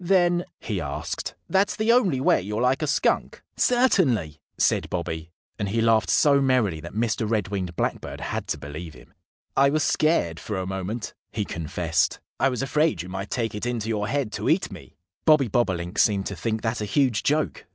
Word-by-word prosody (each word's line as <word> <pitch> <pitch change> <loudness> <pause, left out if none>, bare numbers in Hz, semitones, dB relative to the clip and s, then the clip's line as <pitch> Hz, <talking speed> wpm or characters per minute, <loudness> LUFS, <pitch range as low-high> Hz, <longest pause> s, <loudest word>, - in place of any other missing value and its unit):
"Then," 175 -1 +3
he 100 -5 -3
asked, 70 -2 -4
"that's 195 +1 +2
the 215 +2 +2
only 200 - +3
way 130 - +3
you're 105 +3 -3
like 130 +3 +2
a 155 - 0
Skunk?" 150 - 0
"Certainly!" 130 - +2 0.2
said - - +2
Bobby. 80 -2 -4 0.3
And 100 -2 -1
he 115 +3 0
laughed 115 -1 +3
so 140 -2 +4
merrily 125 -11 +2
that 85 +5 -9
Mr. 110 -1 0
Red 105 -4 0
winged 95 -4 -3
Blackbird - - -3
had - - -4
to - - -1
believe 75 +3 -8
him. - - -17 0.4
"I 140 +1 +5
was 155 +1 +1
scared, 120 - +1
for 105 - -4
a 95 - -2
moment," 95 +4 -4 0.2
he 105 - -2
confessed. 85 -1 -1 0.2
"I 135 - +4
was 125 0 -2
afraid 150 - +1
you 90 - -9
might 95 +2 -5
take 115 -3 -1
it 105 +3 -3
into 115 -3 -2
your 105 -2 -1
head 140 -4 -1
to - - -2
eat - - +2
me." - - -11 0.3
Bobby 150 -5 +5
Bobolink 95 -5 -1
seemed 100 -2 +3
to 100 - -4
think 110 +6 -2
that 115 0 -1
a - - -1
huge 125 -1 +2
joke. 150 -7 0
110 Hz, 195 wpm, -25 LUFS, 95-140 Hz, 0.4 s, I